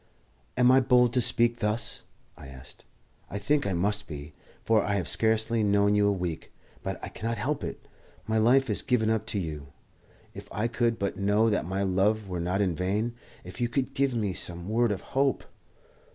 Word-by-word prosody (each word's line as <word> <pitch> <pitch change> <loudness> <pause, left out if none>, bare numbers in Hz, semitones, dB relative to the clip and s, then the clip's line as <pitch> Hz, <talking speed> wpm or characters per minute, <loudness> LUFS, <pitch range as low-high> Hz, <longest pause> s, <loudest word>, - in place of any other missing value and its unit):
"Am 125 0 +5
I 130 - +6
bold 125 -2 +3
to 125 - +2
speak 120 0 +2
thus?" 110 +1 -1 0.3
I - - -12
asked. 65 -1 -14 0.4
"I 100 - -4
think 140 +5 +1
I 95 - -1
must 105 +4 0
be, 75 -1 -8 0.3
for 110 -2 +3
I 100 - -1
have 95 -4 -2
scarcely 110 +1 +2
known 100 0 +3
you 105 0 +3
a - - +3
week. 90 -4 -4 0.3
But - - -4
I - - -5
cannot 115 +2 -4
help 135 +7 -2
it. - - -7 0.4
My 110 0 +1
life 130 +5 +4
is 105 - -1
given 110 -3 +1
up 110 0 -1
to - - -2
you. 75 -6 -4 0.7
If - - -10
I 105 +2 -1
could 120 -1 0
but 100 -2 -3
know 105 +3 +2
that 105 - 0
my 95 +2 -1
love 100 +3 +1
were 90 -2 -4
not 90 +3 0
in 95 -3 +1
vain! 105 +7 -1 0.3
If 90 +6 -9
you 120 - +1
could 130 +1 -2
give 135 -2 0
me 105 -5 -1
some 85 0 -4
word 115 +1 +2
of 100 - -3
hope!" 135 0 0
105 Hz, 200 wpm, -27 LUFS, 95-120 Hz, 0.7 s, I